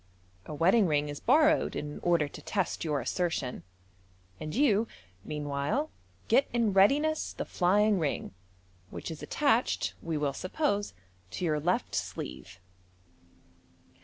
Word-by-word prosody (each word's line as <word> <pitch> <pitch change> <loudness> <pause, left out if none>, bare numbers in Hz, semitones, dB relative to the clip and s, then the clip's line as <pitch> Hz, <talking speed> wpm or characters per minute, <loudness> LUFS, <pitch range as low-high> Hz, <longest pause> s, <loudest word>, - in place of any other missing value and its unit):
A - - -6
wedding 185 +6 +4
rii 145 -2 +2
g 145 - -5
is 145 - -7
borrowed 310 0 +3
in 150 0 -5
cder 170 -4 +2
to - - -10
test 195 -4 -2
your 150 -4 0
assertion, 145 -2 -2 0.8
and 155 +3 -5
you 230 -5 +3 0.4
meanwhile 150 - -2 0.4
get 260 +5 +4
in 230 -4 +1
readiness 290 +11 +3
the - - -4
flying 200 +3 +2
ring, 150 - -2 0.6
which - - -6
is 160 - -8
attached, 265 -5 +1
we 165 -2 -2
will 145 -2 0
suppose, 205 - -1 0.3
to 180 - -4
your 155 -2 +1
left 175 +5 0
sleeve. 65 +8 -5
175 Hz, 130 wpm, -29 LUFS, 150-225 Hz, 0.8 s, wedding